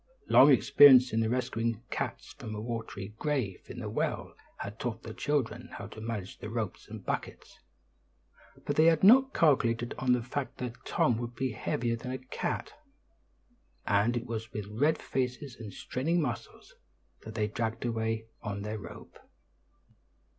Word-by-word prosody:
Long 140 +3 +8
experience 130 -2 +7
in 110 0 +2
rescuing 115 -2 -1
cats - - -4
from 110 -1 -7
a - - -4
watery 110 -4 -5
grave 130 -11 -1
in - - -8
the - - -4
well - - -2 0.2
had 105 +2 -7
taught 115 -2 -4
the 110 - -7
children 125 -1 -1
how - - -6
to 110 - -10
manage 110 -4 -5
the 105 - -6
ropes 110 -4 -4
and - - -9
buckets; - - -5 1.1
but - - -1
they 155 - +6
had 165 0 +4
not 265 +7 +7
calculated 120 -7 +3
on 130 -1 +3
the 125 -2 0
fact 130 +2 -4
that 125 -1 -6
Tom 115 -2 +2
would 120 0 -5
be 130 -1 -1
heavier 115 +2 -1
than 115 +2 -7
a 130 - -2
cat; 130 0 -4 1.1
and 105 +4 +2
it 120 - -4
was 110 -2 -5
with 105 -2 -4
red 145 +9 +2
faces 130 0 -3
and 110 -3 -7
straining 160 - -1
muscles 140 -7 -4 0.5
that 110 0 -9
they 105 -2 +1
dragged 110 +2 -3
away 115 -1 -1 0.2
on 100 -1 -4
their 105 +1 -4
rope. - - -11
120 Hz, 160 wpm, -30 LUFS, 110-130 Hz, 1.1 s, Long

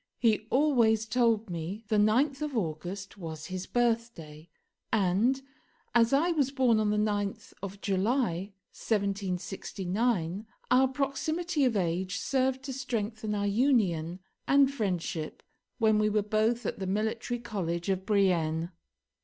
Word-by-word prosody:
He 220 -2 +2
always 240 -6 +3
told 225 -3 +1
me 175 +6 -5
the 215 - +2
9th 255 +8 +3
of 295 -4 -2
August 190 +3 -4
was 160 -3 -6
his 185 0 -4
birthday, 225 -10 -1 0.4
and, 215 +6 +2 0.5
as 230 -1 +4
I 310 +6 +3
was 290 -5 +1
born 255 -5 +3
on 215 -1 +1
the 210 - +1
9th 205 -1 -1
of 195 0 -6
July 195 -1 0 0.2
1769, 195 0 -2 0.2
our 260 +1 +6
proximity 295 +4 -1
of 235 -4 +2
age 185 +1 -1
served 265 0 0
to 270 -1 -5
strengthen 220 -4 -3
our 205 0 -1
union 200 - +1 0.3
and 275 0 +5
friendship 180 - -3 0.3
when 220 -3 +3
we 215 0 +3
were 210 0 +1
both 220 +3 +1
at - - -3
the 190 - -3
Military 220 +4 -1
College 180 -7 -3
of 190 -1 0
Brienne. 175 -5 +1
215 Hz, 135 wpm, -29 LUFS, 190-245 Hz, 0.5 s, our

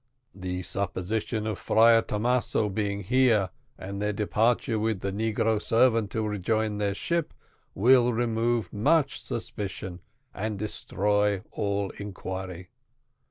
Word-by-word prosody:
The 90 -1 -4
supposition 100 +4 -2
of 110 -3 -3
Friar 115 +1 +5
Thomaso 115 0 0
being 100 0 -2
here, 115 -4 +3 0.3
and 100 +1 -6
their 105 0 +1
departure 110 +3 +1
with 110 -3 -1
the 100 - -2
negro 110 +1 0
servant 115 -3 +3
to 110 -1 -1
rejoin 105 +1 -1
their 100 -1 0
ship, 170 +7 -2 0.4
will 125 +4 +5
remove 115 0 0
much 140 +7 +2
suspicion 95 -3 -5 0.3
and 105 +1 -3
destroy 105 -1 0
all 100 -1 -1
inquiry. 95 -3 -6
105 Hz, 115 wpm, -27 LUFS, 100-115 Hz, 0.4 s, Friar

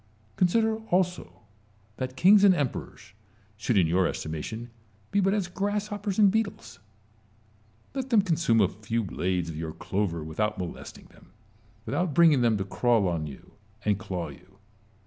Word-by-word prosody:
Consider 220 +4 +2
also 180 -6 -1 0.6
that 130 0 -4
kings 195 +8 +6
and 195 -2 +7
emperors 140 -9 -4 0.4
should 110 +2 0
in 90 - +5
your 90 +2 +2
estimation 110 +10 -5 0.4
be 200 - +2
but 195 0 +3
as 200 -3 0
grasshoppers 205 +1 -3
and 205 -3 +6
beetles: 200 - -3 1.1
let 265 -1 -4
them 220 -5 +4
consume 160 - +2
a - - +5
few 110 +2 -3
blades 90 -2 -2
of - - -8
your 80 -1 -4
clover 90 -5 -2
with 80 +3 -9
out 105 0 0
molesting 90 -2 -7
them, - - -21 0.5
without 175 -5 -1
bringing 160 -6 +6
them 115 -3 +3
to 95 - -3
crawl 115 0 +2
on 80 -3 -2
you 70 - -12 0.3
and 105 -2 +1
claw 90 -4 -4
you. 90 +6 -16
115 Hz, 155 wpm, -27 LUFS, -, 1.1 s, and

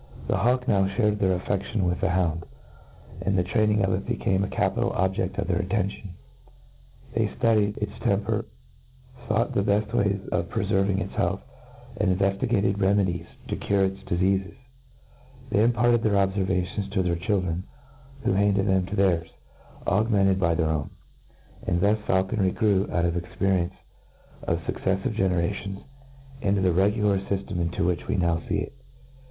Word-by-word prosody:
The - - +1
hawk 125 +2 +1
now 100 -5 +3
(hared 105 +1 +1
their 95 -2 +2
aflfeftion 100 +3 -2
with 90 0 0
the - - +2
hound, 85 -2 0 0.7
and 95 +2 0
the 90 - +3
training 105 +2 +2
of 95 - 0
it 95 +2 -3
became 95 0 0
a - - -1
capital 105 +5 0
objefl: 95 +1 -1
of - - -1
their - - +1
attention. 100 -1 -2 1.0
They - - +1
ftudied 105 -3 +1
its - - -3
tern* - - +1
per, - - -1 0.8
fought 115 +2 +1
the - - +2
beft 105 +1 0
ways 100 0 +2
of - - -1
prefcrving 95 0 +1
its - - -5
health^' - - -1 0.5
and 95 0 +2
inveftigaied 100 +1 +1
remedies 95 -3 +1 0.2
to - - -2
cure 100 -1 +1
its 95 0 -3
difeatfes> 95 +2 0 1.0
They 105 - +4
imparted 120 0 +3
their 110 -2 +1
obfervations 95 0 0
to 95 -2 +2
their 85 -1 0
chil 95 +3 0
dren, 90 0 -3 0.6
who - - +2
handed 100 0 +2
them 95 -2 +2
to 100 - -4
theirs, 90 -4 +2 0.6
augmented' 100 -2 +2
by 85 -3 +2
their 80 -1 +1
own; 75 -2 -2 0.8
and 85 - +1
thus 105 +3 +3
faulconry 95 0 +1
grew, 105 -3 +2
out 85 -1 +1
of 85 - +1
the 90 - 0
experience 95 0 0 0.7
of - - -1
fucceffivc 95 +3 -1
generationSj^ 95 +1 -1 0.6
into 100 -2 +1
the 95 -1 +3
re 95 +4 +4
gular 105 -3 +1
fyftem 95 -3 -2
iiv 85 - -1
which 90 -1 -1
we - - 0
now 85 -3 +2
fee 100 - +1
it. 95 - -6
95 Hz, 165 wpm, -26 LUFS, 90-100 Hz, 1.0 s, They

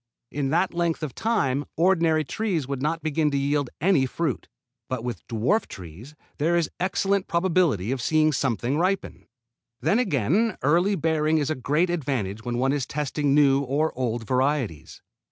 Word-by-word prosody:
In 140 -1 -2
that 175 +5 +1
length 170 -2 -1
of 145 -5 -4
time 145 - 0
ordinary 165 -2 +3
trees 175 - -2
would 140 -2 -4
not 160 +3 -1
begin 155 0 +1
to 140 - -1
yield 140 -1 0
any 155 -6 +3
fruit. 155 +1 -3 0.4
But 130 -3 -3
with 120 -6 -4
dwarf 120 - 0
trees 95 - -11 0.2
there 165 +4 +2
is 165 -3 0
excellent 195 +1 0
probability 170 - +1
of 135 -2 -2
seeing 155 +3 +3
something 130 0 -1
ripen. 190 +2 -2 0.5
Then 160 - +2
again 195 - +1
early 175 +8 +3
bearing 160 -1 +1
is 150 0 0
a - - 0
great 150 +7 0
advantage 125 - -2
when 120 0 -3
one 130 +2 +1
is 140 -3 -2
testing 145 -1 -1
new 140 -2 +5
or 140 +4 -1
old 120 -2 -2
varieties. 130 - -1
150 Hz, 165 wpm, -25 LUFS, 130-170 Hz, 0.5 s, new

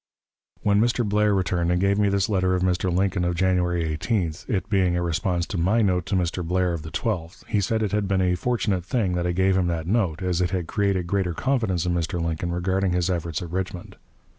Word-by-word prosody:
When 100 0 +3
Mr. 120 -1 +1
Blair 105 +1 +2
returned 90 -2 0
and 90 - +2
gave 100 +2 +2
me 100 -1 +3
this 100 0 +1
letter 95 -3 +1
of 90 - 0
Mr. 90 0 +1
Lincoln 95 +1 +1
of 90 0 0
January 90 -1 +1
18th, 80 +3 -2
it 95 -2 -1
being 95 -4 +2
a 85 - 0
response 85 +1 0
to 100 -5 -4
my 105 +7 +2
note 90 -3 +1
to 100 - 0
Mr. 90 0 -1
Blair 90 +1 0
of 85 - -4
the 80 - -8
12th, 90 -5 -3
he 105 - 0
said 110 +3 0
it 105 - -1
had 105 -1 0
been 95 -1 +1
a 90 -1 +2
fortunate 100 -2 -1
thing 100 -3 0
that 90 0 -1
I - - +1
gave 95 +2 +2
him 90 -2 +2
that 85 -2 -2
note, 95 -4 0
as 90 -1 0
it 90 - +1
had 90 -2 -2
created 100 -2 0
greater 90 -1 -1
confidence 110 -10 0
in 90 - 0
Mr. 85 +1 -1
Lincoln 85 +1 -2
regarding 95 +1 0
his 90 +1 +1
efforts 85 -2 -2
at 85 - -8
Richmond. 95 +1 -4
90 Hz, 235 wpm, -24 LUFS, 85-100 Hz, -, When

